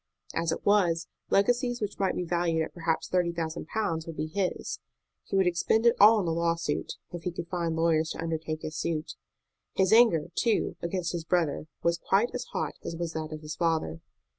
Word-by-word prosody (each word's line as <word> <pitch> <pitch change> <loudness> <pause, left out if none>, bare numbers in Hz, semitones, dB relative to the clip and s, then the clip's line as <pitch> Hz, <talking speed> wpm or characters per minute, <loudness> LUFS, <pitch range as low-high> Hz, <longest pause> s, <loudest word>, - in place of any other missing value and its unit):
As 165 0 0
it - - -4
was, 175 -5 +3 0.2
legacies 245 +4 +2
which 210 -1 -4
might 195 -1 +1
be 180 - -1
valued 170 -2 +1
at - - -7
perhaps 165 -2 -1
thirty 180 -2 +1
thousand 165 -1 -4
pounds 165 -7 -2
would 165 - -7
be 155 - -1
his. 185 +3 -2 0.5
He - - -3
would 190 -1 +4
expend 180 +6 +2
it 235 - +6
all 215 +2 +8
on 200 - 0
the 165 - 0
lawsuit, 170 -2 -1 0.2
if 175 -2 -6
he 180 - -2
could 170 0 -6
find 170 -2 -1
lawyers 160 -1 +2
to - - -10
undertake 160 -1 -3
his 155 - -5
suit. 155 -1 -2 0.6
His 190 +1 +3
anger, 215 -9 +5
too, 230 -3 +1
against 170 0 -2
his 170 -2 -3
brother 160 -3 0 0.2
was 170 0 +2
quite 205 +8 +2
as - - -3
hot - - -3
as 170 - -4
was 165 -1 -3
that 160 0 -4
of 155 0 -6
his 155 0 -6
father. 160 - 0
170 Hz, 205 wpm, -28 LUFS, 160-190 Hz, 0.6 s, all